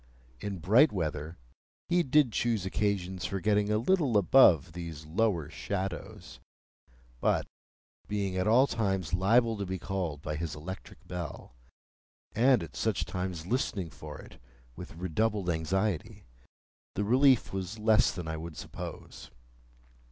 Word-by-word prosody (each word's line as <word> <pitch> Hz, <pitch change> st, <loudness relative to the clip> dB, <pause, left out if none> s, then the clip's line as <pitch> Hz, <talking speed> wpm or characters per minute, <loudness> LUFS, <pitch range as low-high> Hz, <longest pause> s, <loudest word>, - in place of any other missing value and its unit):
In 100 Hz, -2 st, -4 dB
bright 110 Hz, -, +5 dB
weather, 75 Hz, -3 st, -3 dB, 0.5 s
he 175 Hz, 0 st, +3 dB
did 140 Hz, -4 st, +3 dB
choose 110 Hz, -3 st, 0 dB
occasions 95 Hz, -2 st, -1 dB
for 95 Hz, -, -2 dB
getting 105 Hz, +1 st, +2 dB
a 105 Hz, -, +2 dB
little 135 Hz, -, +2 dB
above 90 Hz, -, +5 dB
these 80 Hz, -2 st, -7 dB
lower 85 Hz, -1 st, 0 dB
shadows; 95 Hz, +2 st, -5 dB, 0.8 s
but, -, -, +1 dB, 0.6 s
being 100 Hz, -2 st, -2 dB
at 95 Hz, +1 st, 0 dB
all 120 Hz, +5 st, +6 dB
times 95 Hz, -, -1 dB
liable 115 Hz, +5 st, +3 dB
to 100 Hz, -, -3 dB
be 95 Hz, +1 st, -3 dB
called 85 Hz, -5 st, -4 dB
by 75 Hz, 0 st, -3 dB
his 80 Hz, -1 st, -4 dB
electric 90 Hz, +6 st, -9 dB
bell, 85 Hz, -7 st, -6 dB, 0.8 s
and 125 Hz, -2 st, +4 dB
at 80 Hz, -, -10 dB
such 105 Hz, -6 st, 0 dB
times 90 Hz, -1 st, -4 dB
listening 95 Hz, -, -1 dB
for 75 Hz, -1 st, -9 dB
it -, -, -14 dB, 0.3 s
with -, -, -9 dB
redoubled 90 Hz, +2 st, 0 dB
anxiety, 90 Hz, +3 st, -2 dB, 0.7 s
the 105 Hz, -, 0 dB
relief 130 Hz, +2 st, +4 dB
was 95 Hz, +2 st, -4 dB
less 110 Hz, +1 st, +4 dB
than 90 Hz, -3 st, -6 dB
I 80 Hz, 0 st, -3 dB
would 80 Hz, 0 st, -8 dB
suppose. 75 Hz, -, -8 dB
95 Hz, 135 wpm, -30 LUFS, 85-110 Hz, 0.8 s, all